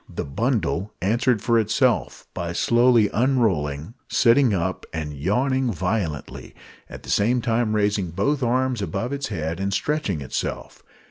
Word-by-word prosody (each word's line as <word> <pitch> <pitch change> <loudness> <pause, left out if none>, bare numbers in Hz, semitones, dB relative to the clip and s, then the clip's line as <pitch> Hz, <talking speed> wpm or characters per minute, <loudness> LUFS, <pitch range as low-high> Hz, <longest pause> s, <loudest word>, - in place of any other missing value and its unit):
The - - -5
bundle 105 - -1
answered 115 +3 +1
for 115 -1 +3
itself; 115 +3 0
by 85 0 -4
slowly 120 +1 +4
unrolling, 100 - 0
sitting 125 0 +4
up 95 -1 -1
and 75 -2 -4
yawning 125 - 0
violently, 90 -5 -3 0.3
at - - -10
the - - -5
same 120 +5 +2
time 115 -1 0
raising 105 -3 +1
both 135 - 0
arms 125 -1 0
above 100 +6 -3
its 140 0 -3
head 80 -3 -4
and 100 0 -1
stretching 100 - -1
itself. 65 - -5
110 Hz, 140 wpm, -23 LUFS, 90-125 Hz, 0.3 s, slowly